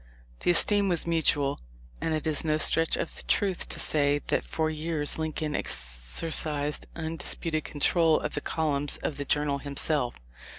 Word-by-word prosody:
The -, -, -1 dB
esteem 200 Hz, +3 st, +5 dB
was 175 Hz, -2 st, +1 dB
mutual, 150 Hz, -4 st, +1 dB, 0.4 s
and 160 Hz, -, 0 dB
it 155 Hz, -, -4 dB
is 155 Hz, -2 st, +3 dB
no 155 Hz, -1 st, +1 dB
stretch 165 Hz, +1 st, +4 dB
of -, -, -4 dB
the -, -, -4 dB
truth 195 Hz, -3 st, 0 dB
to -, -, -6 dB
say 145 Hz, -1 st, +2 dB
that -, -, +1 dB
for 160 Hz, -1 st, -2 dB
years 155 Hz, -1 st, -1 dB
Lincoln 155 Hz, -1 st, -2 dB
exercised 145 Hz, -, -1 dB
undisputed 160 Hz, -1 st, -3 dB
control 160 Hz, +2 st, +2 dB
of 150 Hz, -, -4 dB
the -, -, -2 dB
columns 145 Hz, -3 st, -1 dB
of 145 Hz, -, -2 dB
the 145 Hz, -, -4 dB
Journal 145 Hz, 0 st, +1 dB
himself. 140 Hz, -2 st, -1 dB
155 Hz, 160 wpm, -28 LUFS, 145-165 Hz, 0.4 s, esteem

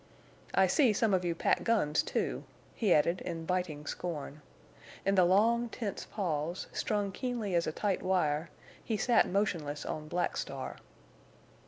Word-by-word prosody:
"I 190 Hz, -, +6 dB
see 230 Hz, +5 st, +4 dB
some 210 Hz, 0 st, +2 dB
of 185 Hz, -1 st, +2 dB
you 170 Hz, -1 st, 0 dB
pack -, -, +1 dB
guns, 180 Hz, -10 st, +2 dB
too!" -, -, -2 dB, 0.3 s
he 215 Hz, -5 st, 0 dB
added, 170 Hz, +3 st, +3 dB
in 165 Hz, -1 st, -5 dB
biting 170 Hz, -4 st, -2 dB
scorn. 150 Hz, -4 st, -5 dB, 0.6 s
In 195 Hz, -, +3 dB
the 185 Hz, -2 st, +5 dB
long, 230 Hz, +6 st, +3 dB
tense 215 Hz, -3 st, -4 dB
pause, 170 Hz, -3 st, -2 dB
strung 205 Hz, -2 st, -1 dB
keenly 235 Hz, -3 st, -3 dB
as 170 Hz, -1 st, +2 dB
a -, -, 0 dB
tight 200 Hz, +4 st, -1 dB
wire, 165 Hz, -4 st, +1 dB, 0.3 s
he 220 Hz, -, -1 dB
sat 240 Hz, +3 st, +3 dB
motionless 165 Hz, -7 st, -1 dB
on 155 Hz, 0 st, -4 dB
Black 175 Hz, +3 st, -1 dB
Star. -, -, -5 dB
185 Hz, 155 wpm, -31 LUFS, 160-210 Hz, 0.6 s, I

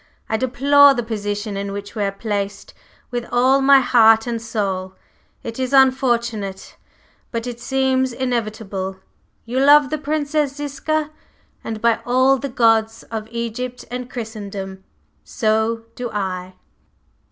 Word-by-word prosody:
I 220 Hz, -, -1 dB
deplore 275 Hz, +4 st, +5 dB
the 240 Hz, -, -1 dB
position 205 Hz, -1 st, -4 dB
in 200 Hz, 0 st, -4 dB
which 200 Hz, 0 st, -7 dB
we 215 Hz, -, -2 dB
are 200 Hz, -, 0 dB
placed 200 Hz, -1 st, -4 dB, 0.4 s
with 240 Hz, -1 st, -2 dB
all 260 Hz, +3 st, +4 dB
my 275 Hz, 0 st, +6 dB
heart 225 Hz, -3 st, +5 dB
and 235 Hz, -2 st, -3 dB
soul. 195 Hz, -5 st, -3 dB, 0.5 s
It 230 Hz, +2 st, -6 dB
is 260 Hz, +1 st, -2 dB
unfortunate, 235 Hz, -7 st, +1 dB, 0.5 s
but 230 Hz, -1 st, -4 dB
it 240 Hz, -1 st, -6 dB
seems 260 Hz, 0 st, +1 dB
inevitable. 215 Hz, -6 st, -3 dB, 0.5 s
You 245 Hz, +3 st, -2 dB
love 290 Hz, 0 st, +6 dB
the 310 Hz, -, -1 dB
Princess 295 Hz, -1 st, -1 dB
Ziska, 295 Hz, +2 st, -2 dB, 0.5 s
and 220 Hz, -1 st, -5 dB
by 235 Hz, -1 st, +3 dB
all 260 Hz, +2 st, +3 dB
the 280 Hz, -, -4 dB
gods 225 Hz, -2 st, +2 dB
of 220 Hz, -1 st, -4 dB
Egypt 235 Hz, +2 st, -5 dB
and 250 Hz, 0 st, -5 dB
Christendom, 200 Hz, -5 st, -7 dB, 0.4 s
so 220 Hz, -, 0 dB
do 245 Hz, -1 st, -5 dB
I!" 185 Hz, -3 st, -4 dB
235 Hz, 135 wpm, -20 LUFS, 210-260 Hz, 0.5 s, my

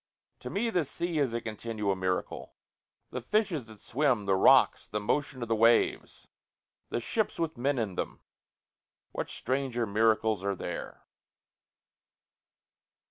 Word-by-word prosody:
To -, -, -7 dB
me 230 Hz, +3 st, -1 dB
the 175 Hz, -6 st, +2 dB
sea 170 Hz, +3 st, -2 dB
is 135 Hz, -4 st, +2 dB
a 115 Hz, -, -1 dB
continual 110 Hz, -2 st, -2 dB
miracle, 95 Hz, -1 st, -3 dB, 0.6 s
The 125 Hz, -, -4 dB
fishes 170 Hz, -, 0 dB
that 110 Hz, -2 st, -13 dB
swim 125 Hz, -4 st, +1 dB
the 100 Hz, -, +2 dB
rocks 95 Hz, -, +5 dB
the 105 Hz, -, -2 dB
motion 130 Hz, +4 st, -1 dB
of -, -, -4 dB
the 115 Hz, -, +1 dB
waves 115 Hz, +1 st, +2 dB, 0.6 s
the -, -, -1 dB
ships 215 Hz, -, -1 dB
with 165 Hz, -1 st, -2 dB
men 135 Hz, +3 st, 0 dB
in 110 Hz, -5 st, -1 dB
them, -, -, -4 dB, 0.9 s
What -, -, -4 dB
stranger 130 Hz, -2 st, -1 dB
miracles 110 Hz, -1 st, +2 dB
are 100 Hz, 0 st, 0 dB
there? 90 Hz, -1 st, -6 dB
115 Hz, 135 wpm, -29 LUFS, 105-145 Hz, 0.9 s, rocks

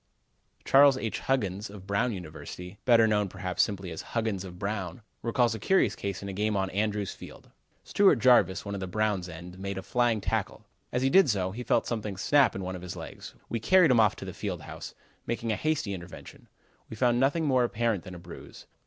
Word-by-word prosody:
Charles 140 Hz, -1 st, +6 dB
H. 115 Hz, -4 st, -3 dB
Huggins, 105 Hz, -6 st, -1 dB
of 100 Hz, -2 st, -11 dB
Brown 100 Hz, +5 st, 0 dB
University, 90 Hz, +1 st, -8 dB
better 115 Hz, -2 st, +6 dB
known 105 Hz, -2 st, +1 dB
perhaps, 90 Hz, -2 st, -2 dB
simply 95 Hz, -4 st, -1 dB
as 80 Hz, -, -5 dB
"Huggins 110 Hz, -5 st, -2 dB
of 90 Hz, -2 st, -9 dB
Brown," 100 Hz, 0 st, -4 dB, 0.2 s
recalls 120 Hz, 0 st, +1 dB
a 110 Hz, -, -5 dB
curious 190 Hz, -, +2 dB
case 100 Hz, -1 st, -4 dB
in -, -, -5 dB
a 100 Hz, -, -5 dB
game 105 Hz, +1 st, 0 dB
on 95 Hz, -1 st, -1 dB
Andrews 105 Hz, 0 st, -1 dB
Field: -, -, -13 dB, 0.3 s
"Stewart 195 Hz, -8 st, +4 dB
Jarvis, 120 Hz, -6 st, +4 dB
one 100 Hz, -, -4 dB
of 100 Hz, -, -3 dB
the 95 Hz, -, -4 dB
Brown 105 Hz, 0 st, 0 dB
ends, 90 Hz, +2 st, -10 dB
made 100 Hz, 0 st, -4 dB
a 95 Hz, -, -5 dB
flying 120 Hz, -1 st, +1 dB
tackle. 95 Hz, -, -3 dB, 0.3 s
As 125 Hz, +1 st, 0 dB
he 135 Hz, -, +2 dB
did 190 Hz, -3 st, +6 dB
so, 95 Hz, -4 st, 0 dB
he 115 Hz, +5 st, -6 dB
felt -, -, +1 dB
something 105 Hz, -4 st, -3 dB
snap 145 Hz, +8 st, +3 dB
in 95 Hz, -, -4 dB
one 95 Hz, 0 st, -4 dB
of 90 Hz, -, -8 dB
his 90 Hz, -, -7 dB
legs. -, -, -9 dB
We 115 Hz, -, -2 dB
carried 180 Hz, -, +5 dB
him 120 Hz, -, +5 dB
off 105 Hz, -3 st, +4 dB
to -, -, -8 dB
the -, -, -6 dB
field -, -, -4 dB
house, -, -, -9 dB, 0.3 s
making 115 Hz, -1 st, -2 dB
a -, -, +1 dB
hasty 155 Hz, -9 st, -1 dB
investigation. 90 Hz, -1 st, -10 dB, 0.4 s
We -, -, -7 dB
found 120 Hz, +1 st, +2 dB
nothing 145 Hz, +5 st, +2 dB
more 130 Hz, -3 st, +3 dB
apparent 115 Hz, -5 st, 0 dB
than 90 Hz, -, -9 dB
a -, -, -9 dB
bruise. 85 Hz, 0 st, -12 dB
105 Hz, 215 wpm, -28 LUFS, 95-120 Hz, 0.4 s, Charles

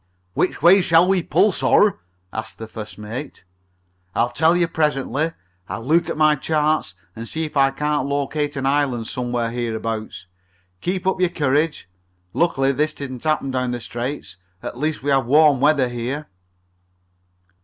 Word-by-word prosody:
"Which 185 Hz, -, -1 dB
way 190 Hz, +3 st, +7 dB
shall 170 Hz, 0 st, +4 dB
we 190 Hz, -1 st, +2 dB
pull, 210 Hz, +5 st, +3 dB
sir?" 205 Hz, +2 st, +3 dB, 0.3 s
asked 110 Hz, -, -6 dB
the 110 Hz, -, -7 dB
first 110 Hz, -1 st, -8 dB
mate. 110 Hz, +6 st, -7 dB, 0.7 s
"I'll 120 Hz, +1 st, +1 dB
tell 160 Hz, +6 st, +3 dB
you 175 Hz, -1 st, +2 dB
presently. 150 Hz, -1 st, 0 dB, 0.4 s
I'll 115 Hz, -, -5 dB
look 165 Hz, +5 st, +2 dB
at -, -, -3 dB
my 155 Hz, -1 st, +5 dB
charts 150 Hz, -, 0 dB, 0.2 s
and 115 Hz, +1 st, -7 dB
see 160 Hz, 0 st, -2 dB
if 150 Hz, -, -9 dB
I 135 Hz, -1 st, +5 dB
can't 145 Hz, 0 st, -1 dB
locate 145 Hz, +1 st, -1 dB
an 135 Hz, -1 st, -3 dB
island 135 Hz, -4 st, +1 dB
somewhere 120 Hz, -2 st, -2 dB
here 120 Hz, -2 st, -2 dB
abouts. 110 Hz, -4 st, -5 dB, 0.5 s
Keep 185 Hz, -, -2 dB
up 190 Hz, 0 st, +1 dB
your 180 Hz, -, +3 dB
courage. 150 Hz, -, 0 dB, 0.5 s
Luckily 135 Hz, -5 st, +2 dB
this 150 Hz, +3 st, 0 dB
didn't 130 Hz, -3 st, -7 dB
happen 155 Hz, -3 st, 0 dB
down 130 Hz, -1 st, -1 dB
in 125 Hz, -, -2 dB
the 120 Hz, -, -3 dB
Straits. 120 Hz, -5 st, -5 dB, 0.3 s
At -, -, -5 dB
least 150 Hz, +2 st, -2 dB
we 145 Hz, -, 0 dB
have 135 Hz, -3 st, +2 dB
warm 150 Hz, 0 st, +5 dB
weather 145 Hz, -3 st, +4 dB
here." 125 Hz, +5 st, -4 dB
140 Hz, 165 wpm, -21 LUFS, 120-155 Hz, 0.7 s, way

